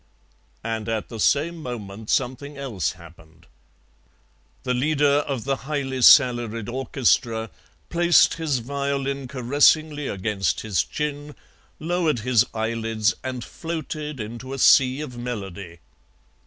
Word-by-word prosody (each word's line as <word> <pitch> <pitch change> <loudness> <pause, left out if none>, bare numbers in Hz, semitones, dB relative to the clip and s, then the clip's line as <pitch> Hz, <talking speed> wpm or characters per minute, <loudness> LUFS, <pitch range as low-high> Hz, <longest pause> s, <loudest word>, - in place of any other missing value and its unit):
And 115 -1 -3
at 110 -2 -2
the 115 - -8
same 155 +9 +2
moment 110 -7 -7
something 135 +3 -1
else 115 - -2
happened. 85 -2 -17 1.2
The 125 - 0
leader 145 +2 +2
of 130 -5 -2
the 135 0 -1
highly 135 -2 -3
salaried 120 -5 +5
orchestra 120 -3 0 0.4
placed 170 0 +5
his 155 -5 -1
violin 140 0 -2
caressingly 145 +3 +2
against 95 -4 -1
his 100 -7 0
chin, 150 0 -5 0.4
lowered 160 -5 0
his 120 -1 +3
eyelids, 110 -1 -1
and 130 -2 -4
floated 155 -3 -5
into 120 +4 -6
a - - -4
sea 130 +1 +5
of 125 -5 -7
melody. 95 -8 -6
125 Hz, 115 wpm, -23 LUFS, 110-145 Hz, 1.2 s, salaried